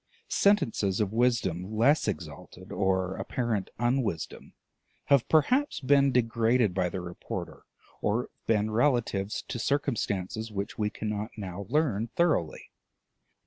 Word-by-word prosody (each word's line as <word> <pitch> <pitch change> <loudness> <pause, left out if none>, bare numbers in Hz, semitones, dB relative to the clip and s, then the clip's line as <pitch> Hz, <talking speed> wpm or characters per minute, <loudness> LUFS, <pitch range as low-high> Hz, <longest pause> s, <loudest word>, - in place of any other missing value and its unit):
Sentences 125 - +2
of 105 -1 0
wisdom 110 -5 0
less 140 +6 +4
exalted, 80 -8 -6
or 95 -1 0
of - - -5
apparent 115 -6 -2
unwisdom, 120 -8 -2 0.5
have 140 -4 +3
perhaps 250 - +3
been 140 0 +4
degraded 115 -3 +2
by 90 -1 0
the 95 - -4
reporter, 90 -1 -7 0.4
or 105 +4 +1
have - - -15
been 110 -1 +2
relative 115 -5 +1 0.2
to 125 -2 -4
circumstances 110 -6 -1
which 100 -1 -4
we 105 -1 0
cannot 105 +1 -4
now 95 -1 -6
learn 125 -7 +1
thoroughly. 160 - 0
110 Hz, 125 wpm, -28 LUFS, 95-130 Hz, 0.5 s, less